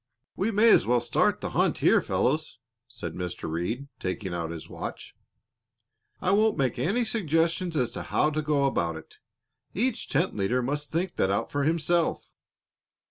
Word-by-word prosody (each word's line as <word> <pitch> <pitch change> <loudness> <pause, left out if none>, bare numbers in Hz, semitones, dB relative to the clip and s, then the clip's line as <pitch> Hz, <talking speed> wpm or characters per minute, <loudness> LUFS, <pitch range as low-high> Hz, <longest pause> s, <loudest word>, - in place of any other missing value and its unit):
"We 200 - 0
may 220 +1 +5
as - - +5
well 120 0 +4
start 120 - +1
the - - -4
hunt - - +2
here, - - +4
fellows," - - -1 0.3
said - - -7
Mr. 90 -1 -5
Reed, 90 - -3
taking 95 0 -3
out 85 -1 -3
his 80 -1 -7
watch. - - -7 1.1
"I 185 - +1
won't 215 +1 +3
make 130 -3 0
any 230 +8 +1
suggestions 170 -4 0
as 125 -4 +1
to - - -5
how 150 - +1
to 155 +1 -1
go 150 -2 +1
about 85 -12 0
it; 80 0 -12 0.6
each 250 +7 -1
tent 165 +7 +1
leader 115 +6 0
must 145 +3 -3
think 175 +3 -2
that 95 - +2
out 100 - -1
for 145 -1 0
himself. 165 +1 +1
145 Hz, 170 wpm, -27 LUFS, -, 1.1 s, may